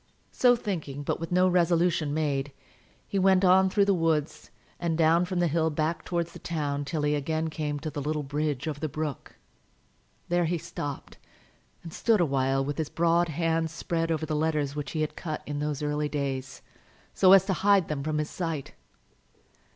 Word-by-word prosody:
So 245 -1 +4
thinking, 160 - -4
but - - -2
with 165 +1 -6
no 180 +1 +4
resolution 170 -3 +2
made, 145 -2 -1 0.6
he 200 - -1
went 190 0 +4
on 190 +1 +5
through 200 +1 +3
the 200 - +3
woods, 165 -4 -1 0.3
and 170 -2 -1
down 165 +2 +4
from 180 0 -4
the 175 0 +2
hill 160 +1 +1
back 155 +2 -2
towards 170 -1 -2
the - - -10
town 145 -3 -2
till 150 +1 -2
he 150 0 +2
again 155 +2 -1
came 150 -2 -3
to 155 0 -4
the 145 - -4
little 150 +1 -2
bridge 145 0 -2
over 150 -2 -3
the 155 - -2
brook. 150 -2 -5 0.9
There 175 0 +1
he 170 +2 0
stopped 145 -4 -7 0.6
and 165 -2 -9
stood 225 -3 +2
a 175 - +4
while 135 -1 +1
with 145 +2 -4
his 155 - -2
broad 170 +1 +2
hand 165 +1 0
spread 165 +1 -2
over 160 -1 -1
the 155 0 -2
letters 150 -2 0
which 145 -1 -5
he 155 - -1
had 155 - -2
cut 155 -2 -5
in 145 0 -4
those 150 0 -2
early 150 0 -1
days, 135 -3 -4 0.5
so 185 - +5
as 190 -1 +7
to 195 - 0
hide 195 -1 +3
them 150 -2 -3
from 155 0 -1
his 150 0 -2
sight. 165 -6 -4
160 Hz, 195 wpm, -27 LUFS, 150-170 Hz, 0.9 s, as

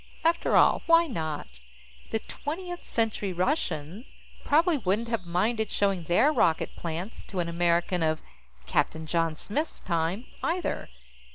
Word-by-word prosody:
After 335 +1 +2
all, - - +5
why 335 0 +6
not? 155 - -5 0.5
The 225 - 0
Twentieth 350 - -6
Century 215 -4 -1
Russians 180 - -2 0.3
probably 320 +1 +3
wouldn't 215 +3 0
have 220 -7 -2
minded 215 +5 0
showing 195 -4 +1
their 225 - +4
rocket 165 - +2
plants 170 +6 -5
to 190 - -5
an 170 - 0
American 170 +1 +1
of 155 -1 +1 0.5
Captain 160 - 0
John 165 0 0
Smith's 290 - -2
time, 170 +6 -1 0.2
either. 350 +2 -1
190 Hz, 130 wpm, -28 LUFS, 170-260 Hz, 0.5 s, why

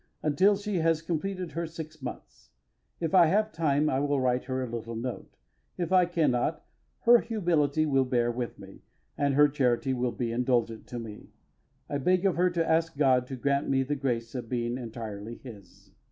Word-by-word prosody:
until 185 +7 +4
she 205 -1 -3
has 165 -1 +2
completed 180 +2 -3
her 170 0 -3
six 155 -1 -9
months. 130 - -9 0.5
If 165 -2 -2
I 175 -3 +7
have 210 +5 +2
time 155 -3 +1
I 135 -2 +1
will 145 0 +1
write 125 -1 0
her 130 0 -2
a - - -4
little 115 0 -5
note; 120 +2 -6 0.4
if 175 0 -3
I 185 -1 +5
cannot, 155 -3 0 0.4
her 240 0 +7
humility 160 - +1
will 135 -3 +3
bear 120 -2 +1
with 120 0 -4
me, 95 -1 -13 0.3
and 140 -1 +1
her 150 +1 +7
charity 135 -2 +1
will 125 -1 -1
be 120 -1 -3
indulgent 120 -2 0
to 120 - -6
me. 110 -3 -9 0.6
I 145 - -2
beg 180 +6 +2
of 190 - +3
her 180 +2 +3
to 170 -2 -1
ask 165 -1 +1
God 130 -3 +3
to 135 - -5
grant 140 +2 0
me 135 -1 +2
the 145 +3 -2
grace 120 -4 -2
of 120 -3 -5
being 120 -1 -1
entirely 115 -3 -6
His. 110 -7 -14
140 Hz, 190 wpm, -28 LUFS, 120-165 Hz, 0.6 s, I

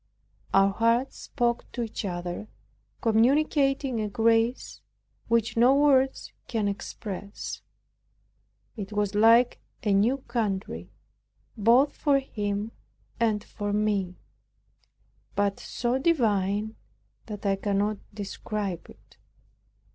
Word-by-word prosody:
Our 195 0 +5
hearts 230 +5 +1
spoke 240 -2 -2
to 240 - -2
each 225 -1 -5
other, 175 +2 -4 0.5
communicating 270 +2 +2
a 210 - -2
grace 230 +3 +1 0.5
which 230 -1 +1
no 245 +4 +5
words 270 -2 +2
can 220 -3 -1
express. 200 0 -6 1.1
It 205 -3 -6
was 205 -1 0
like 230 +3 +5 0.2
a 210 -3 +2
new 220 +7 +3
country, 225 -7 -3 0.7
both 240 +6 +4
for 285 -2 +3
him 210 -4 -3 0.5
and 215 -3 +1
for 205 -2 -5
me; 205 -3 0 1.2
but 200 -1 0
so 245 +1 -2
divine, 215 - +1 0.5
that 210 -2 -7
I 195 -1 +3
cannot 205 +1 -1
describe 200 -2 -5
it. - - -18
220 Hz, 100 wpm, -27 LUFS, 205-240 Hz, 1.2 s, Our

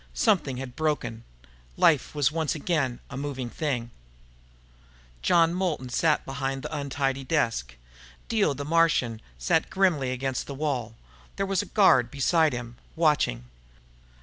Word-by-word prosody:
Something 175 - +2
had 125 -1 -7
broken. 125 -7 -2 0.5
Life 155 -3 +3
was 145 -1 +2
once 160 -1 -1
again 145 -6 -1
a - - -6
moving 135 -3 -4
thing. 125 -7 -2 1.3
John 165 - +4
Moulton 175 -8 -2
sat 155 +5 +1
behind 135 0 -3
the 150 +1 -5
untidy 135 -1 -2
desk. 115 - -1 0.5
Dio 210 -11 +1
the 145 +1 -5
Martian 150 -8 +2 0.2
sat - - +1
grimly 175 -9 +2
against 130 0 -3
the 140 - -6
wall. 130 -6 -2 0.4
There 195 - -1
was 195 -2 +1
a - - -8
guard 130 - +4
beside 155 +4 +2
him, 120 -1 -6 0.2
watching. 150 - +2
140 Hz, 135 wpm, -26 LUFS, 125-160 Hz, 1.3 s, John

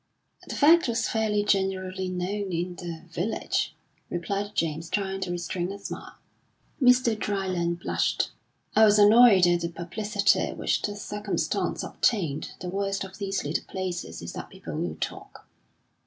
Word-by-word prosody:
"The - - -5
fact 330 +1 +6
was 230 -1 0
fairly 215 -2 +1
generally 190 -2 0
known 190 +2 -2
in 175 +1 -2
the 170 -2 -6
village," 180 +7 -1 0.3
replied 200 +4 -3
James, 160 0 -1
trying 195 -1 -2
to 190 - -2
restrain 175 +1 -3
a 200 - -6
smile. 200 - -8 0.7
Mr. 250 -2 +5
Dryland 185 -5 -1
blushed. - - 0 0.4
"I 220 - +7
was 210 -1 +6
annoyed 210 -2 +7
at 175 0 +3
the 170 - -1
publicity 200 +5 0
which - - 0
the 205 - -2
circumstance 205 0 -2
obtained. 160 - 0
The 180 - -4
worst 195 +1 -1
of 190 +1 -10
these 195 -2 -2
little 150 +3 -1
places 185 -2 -5
is - - -6
that - - -7
people - - -9
will - - -2
talk." - - -6
195 Hz, 150 wpm, -27 LUFS, 175-210 Hz, 0.7 s, I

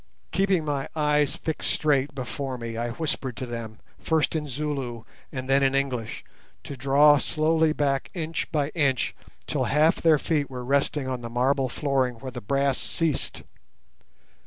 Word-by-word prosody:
Keeping 190 -4 +2
my 140 -2 -1
eyes 150 -2 +2
fixed 160 - -3
straight 145 -2 +1
before 130 +1 -4
me, 115 -1 -5
I 120 +1 -2
whispered 130 -3 -2
to 130 - -3
them, 115 -3 -6 0.2
first 160 0 +1
in 150 -1 -1
Zulu 135 -4 -3 0.3
and 130 -2 -5
then 135 +1 +4
in 135 0 +3
English, 130 -5 -2 0.4
to 140 - -7
draw 140 +3 +5
slowly 160 +1 +2
back 140 -3 0
inch 165 -1 -3
by 150 -3 +1
inch 140 -6 +1 0.3
till - - 0
half 155 +3 +3
their 160 -2 +4
feet 145 -1 0
were 125 -2 -6
resting 140 +1 +1
on 130 -2 -3
the 120 - -6
marble 130 +2 +1
flooring 130 -2 0
where 130 +3 -7
the 125 0 -7
brass 140 +4 +1
ceased. 165 -4 -1
140 Hz, 160 wpm, -26 LUFS, 130-150 Hz, 0.4 s, draw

